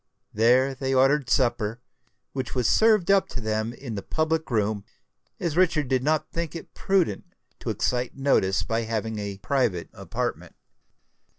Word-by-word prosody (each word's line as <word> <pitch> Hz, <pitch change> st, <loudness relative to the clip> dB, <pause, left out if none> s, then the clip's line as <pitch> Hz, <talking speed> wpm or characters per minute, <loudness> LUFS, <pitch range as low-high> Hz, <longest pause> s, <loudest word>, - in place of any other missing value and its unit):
There 125 Hz, +5 st, +4 dB
they 135 Hz, 0 st, -2 dB
ordered 135 Hz, +1 st, +3 dB
supper, 115 Hz, -3 st, +1 dB, 0.5 s
which 130 Hz, -1 st, -4 dB
was 125 Hz, -3 st, +1 dB
served 215 Hz, -4 st, +4 dB
up 195 Hz, -1 st, +4 dB
to -, -, -6 dB
them 110 Hz, 0 st, -1 dB
in 120 Hz, -1 st, -8 dB
the 100 Hz, -, -4 dB
public 160 Hz, +6 st, -1 dB
room, 105 Hz, -3 st, 0 dB, 0.6 s
as 165 Hz, -3 st, -2 dB
Richard 165 Hz, -6 st, +2 dB
did 130 Hz, -1 st, +2 dB
not 155 Hz, +3 st, 0 dB
think 170 Hz, -1 st, -3 dB
it 165 Hz, -, -9 dB
prudent 185 Hz, -, 0 dB, 0.3 s
to -, -, -5 dB
excite 125 Hz, +1 st, -1 dB
notice 95 Hz, -10 st, +2 dB
by 115 Hz, +8 st, -1 dB
having 110 Hz, -1 st, -3 dB
a 100 Hz, -1 st, -5 dB
private 110 Hz, -5 st, -1 dB
apartment. -, -, -4 dB
130 Hz, 155 wpm, -25 LUFS, 110-155 Hz, 0.6 s, There